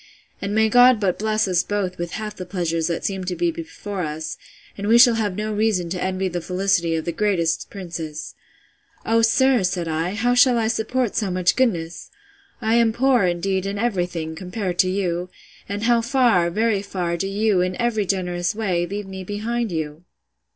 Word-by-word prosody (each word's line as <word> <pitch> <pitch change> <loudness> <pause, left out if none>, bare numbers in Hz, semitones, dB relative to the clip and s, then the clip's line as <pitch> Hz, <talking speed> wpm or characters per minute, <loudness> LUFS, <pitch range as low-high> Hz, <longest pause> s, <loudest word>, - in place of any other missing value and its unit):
and 200 +1 -2
may 220 0 +4
God 245 +1 +6
but 190 -4 0
bless 215 0 +1
us 180 -2 +2
both 195 -3 -3
with 175 0 -4
half 215 -1 -5
the 185 - -6
pleasures 170 -3 -2
that 170 -1 -3
seem 190 -2 -2
to 180 0 -2
be 345 -1 +1
before 315 - -6
us, 155 -1 -4 0.4
and 200 0 -4
we 230 +2 +6
shall 240 0 +8
have 210 -4 -1
no 215 +1 -3
reason 205 -5 0
to 180 -1 -3
envy 190 0 -1
the 175 -1 -3
felicity 180 -2 0
of 160 - -3
the 170 - -1
greatest 170 -3 0
princes!—O 170 +5 -5
sir, 250 +2 +4
said 180 -2 -1
I, 165 +4 -2
how 245 +3 +1
shall 245 0 +5
I 220 -1 +1
support 230 +1 -1
so 215 -4 0
much 180 -1 +1
goodness! 175 -10 -1 0.5
I 220 -1 +1
am 230 -1 +3
poor, 250 -3 +3
indeed, 190 +2 -1
in 200 +1 -3
every 200 -5 0
thing, 160 -2 -5
compared 180 +1 -4
to 185 - +4
you! 180 -2 -2 0.4
and 205 +1 -3
how 235 0 +3
far, 235 -8 +3
very 215 +2 +1
far, 180 -4 -3
do 170 +3 -2
you, 205 -1 +1
in 180 0 -2
every 225 -4 0
generous 180 -1 -1
way, 180 -6 -1
leave 205 +3 -5
me 190 0 -7
behind 220 +3 -3
you! 160 0 -4
195 Hz, 195 wpm, -22 LUFS, 175-220 Hz, 0.5 s, shall